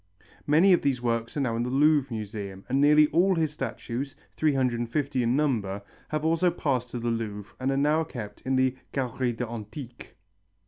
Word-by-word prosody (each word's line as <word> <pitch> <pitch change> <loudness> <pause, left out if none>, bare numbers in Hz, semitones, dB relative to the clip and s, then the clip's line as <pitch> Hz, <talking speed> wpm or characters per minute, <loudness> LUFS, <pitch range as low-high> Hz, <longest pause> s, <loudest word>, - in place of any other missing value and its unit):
Many 165 +6 +6
of 175 - +3
these 135 -3 +1
works 115 +1 -2
are - - +1
now 120 -4 0
in 115 - -1
the 120 - -1
Louvre 145 0 +3
Museum 100 -3 -6
and 135 +2 +1
nearly 150 +1 +6
all 180 +5 +3
his 160 -3 0
statues, 135 -3 -4 0.2
350 130 -1 0
in 120 +1 +2
number, 110 -9 0 0.3
have 155 0 -2
also 165 +3 +3
passed 135 -7 -1
to 120 - -5
the 120 0 -1
Louvre 105 -2 -4
and 130 +1 0
are 135 - +1
now 150 +3 +3
kept 115 -10 -8
in 130 0 0
the 130 0 +2 0.2
Galérie 125 -2 -1
des 125 - -1
Antiques. 115 +2 -8
130 Hz, 185 wpm, -27 LUFS, 115-150 Hz, 0.3 s, Many